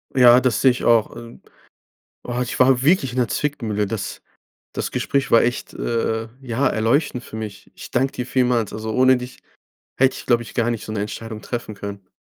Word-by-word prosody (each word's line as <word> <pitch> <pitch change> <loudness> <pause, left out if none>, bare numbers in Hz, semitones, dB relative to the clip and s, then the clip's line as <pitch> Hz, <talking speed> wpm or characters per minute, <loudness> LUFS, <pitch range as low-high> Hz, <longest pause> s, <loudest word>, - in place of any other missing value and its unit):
Ja, 125 -1 +7
das 130 -5 0
sehe 130 - +6
ich 125 - -5
auch. 115 -2 +3
Äh, 120 0 -11 0.8
boah, 125 0 -3
ich 125 - -3
war 130 -1 +5
wirklich 140 -3 +3
in - - -6
der 120 - +2
Zwickmühle. 115 -9 -1
Das 100 -1 -5 0.5
das - - -3
Gespräch 140 -1 -1
war 115 - +6
echt, 120 +1 -2
äh 115 -1 -1
äh, - - -12
ja 130 0 -1
erleuchtend 125 +4 0
für - - -9
mich. 105 -3 -7
Ich - - -11
danke 130 +2 +1
dir 125 - -4
vielmals. 125 -4 +1
Also 110 0 -4
ohne 130 0 +5
dich 125 0 -8 0.6
hätte 135 0 +4
ich, - - -9
glaube 120 -1 +2
ich, - - -12
gar 120 -1 +1
nicht 115 - -5
so - - -6
'ne 105 - -2
Entscheidung 110 +1 -6
treffen 120 -3 -5
können. 100 -1 -8
120 Hz, 205 wpm, -21 LUFS, 110-130 Hz, 0.8 s, Ja